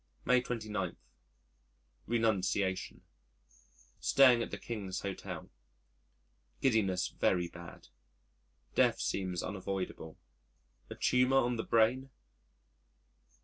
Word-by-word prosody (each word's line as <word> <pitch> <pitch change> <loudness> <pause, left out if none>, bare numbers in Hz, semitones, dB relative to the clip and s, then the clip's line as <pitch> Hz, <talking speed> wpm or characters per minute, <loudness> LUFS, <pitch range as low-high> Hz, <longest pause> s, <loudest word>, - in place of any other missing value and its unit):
May 125 0 +4
29. 110 -7 -3 1.1
Renunciation 100 -4 0 1.0
Staying 130 -4 +5
at - - -3
the - - -5
King's 100 -5 -5
Hotel,. 100 -1 -6 1.1
Giddiness 100 -7 +1
very 90 -2 +1
bad. 85 -5 -12 0.8
Death - - +3
seems 90 -3 -2
unavoidable. 95 -4 -5 0.7
A - - -7
tumour 125 +1 +3
on 120 0 -1
the 110 - -2
brain? 120 +4 +2
105 Hz, 85 wpm, -32 LUFS, 95-120 Hz, 1.1 s, Staying